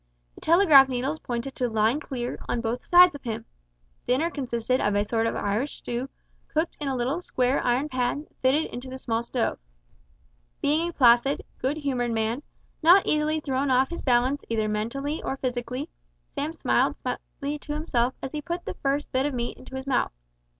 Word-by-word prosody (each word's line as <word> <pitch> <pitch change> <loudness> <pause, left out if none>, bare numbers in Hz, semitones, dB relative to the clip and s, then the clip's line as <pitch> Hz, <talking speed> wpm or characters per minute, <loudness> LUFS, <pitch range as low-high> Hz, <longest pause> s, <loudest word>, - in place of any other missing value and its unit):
The - - -15
telegraph 315 -6 +7
needles 265 +5 -2
pointed 245 +2 -4
to 250 -1 -1
"Line 220 +5 +2
clear" 250 -5 -4
on 240 - 0
both 230 +2 -2
sides 355 0 +8
of 285 - -9
him. 225 -2 -4 0.6
Dinner 300 +7 +2
consisted 255 -3 -1
of 205 0 +1
a 205 0 +2
sort 225 +1 0
of - - -2
Irish 215 +8 -1
stew 245 +3 -4 0.4
cooked 320 +2 -1
in 295 - -3
a 270 - 0
little 260 +8 -1
square 255 -5 0
iron 250 +4 +1
pan 255 +1 -1
that - - -27
fitted 270 +5 +3
into 250 +2 -6
the 260 - -6
small 230 -3 -1
stove. 235 0 -2 1.0
Being 315 +4 +1
a - - -8
placid, 245 +1 +4 0.2
good 270 +4 -1
humoured 255 -5 -1
man, 225 +4 -1 0.4
not 355 +5 +7
easily 305 +1 +1
thrown 275 -1 -1
off 260 +2 +3
his 340 - -4
balance 255 +2 +2
either 220 -2 0
mentally 255 +9 -2
or 270 - -3
physically, 250 +2 -3 0.5
Sam 290 +2 -2
smiled - - +1
slightly 290 +1 -5
to 295 - -5
himself 255 -5 0
as 270 - -4
he 300 - -4
put 345 +3 -4
the - - -4
first 280 +1 -2
bit 260 +2 +1
of 285 - -3
meat 240 0 -3
into 265 - -11
his 265 0 -5
mouth. 265 -3 +1
260 Hz, 190 wpm, -26 LUFS, 240-295 Hz, 1.0 s, sides